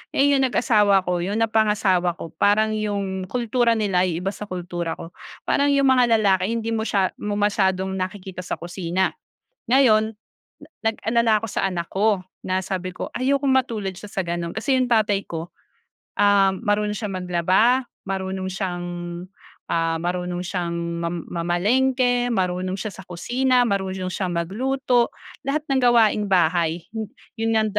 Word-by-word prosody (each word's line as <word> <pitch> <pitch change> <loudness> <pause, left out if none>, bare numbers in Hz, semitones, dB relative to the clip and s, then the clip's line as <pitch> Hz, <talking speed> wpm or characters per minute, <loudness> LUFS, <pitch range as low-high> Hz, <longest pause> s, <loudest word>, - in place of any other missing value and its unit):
Eh, 280 +1 +4
yung 270 - +3
nag-asawa 210 -6 +3
ako 180 -1 0
yung 200 +4 -2
napangasawa 210 -6 +2
ko 165 - -7
parang 215 +2 +3
yung 200 -3 -2
kultura 240 -1 +1
nila 195 -4 +1
yung 175 0 -3
iba 195 - +1
sa 210 - -7
kultura 175 -2 -4
ko. 165 - -9 0.4
Parang 285 0 +2
yung 280 -1 +3
mga 250 -3 +5
lalaki 190 -2 +2
hindi 230 0 -2
mo 220 - -1
siya 195 -2 +1
mo 210 0 -2
masyadong 190 -2 +1
nakikita 185 0 -5
sa - - -3
kusina. 175 +1 -1 0.6
Ngayon 225 -4 +4 0.7
nag-alala 225 0 +2
ako 225 - -4
sa - - 0
anak 170 -2 -4
ko 205 0 +2 0.2
na 185 0 0
sabi 185 -1 -4
ko - - -5
ayokong 275 +2 +1
matulad 230 -7 0
siya 195 +3 -10
sa 195 - -2
gano'n, 170 0 -3
kasi 260 +5 +1
yung 255 -1 +1
tatay 210 -3 +2
ko, 165 +1 -5 0.7
ah, 200 -1 +5
marunong 210 0 0
siyang 205 -3 -4
maglaba, 185 +9 +3 0.3
marunong 190 -1 -3
siyang, 185 -2 -3 0.9
ah, 165 -1 +1
marunong 180 0 -2
siyang 175 -2 -3 0.3
mam 170 -1 -3
mamalengke, 245 +9 +1
marunong 185 -1 -1
siya 215 +2 -4
sa 190 - -10
kusina, 250 +8 +1
marunong 190 -3 -2
siyang 185 -1 -2
magluto, 245 +8 0 0.4
lahat 290 +2 0
ng 270 - +3
gawaing 225 -4 +4
bahay 170 -2 +2 0.6
'yon 225 0 +1
nga 220 0 +3
200 Hz, 150 wpm, -23 LUFS, 180-225 Hz, 0.9 s, mga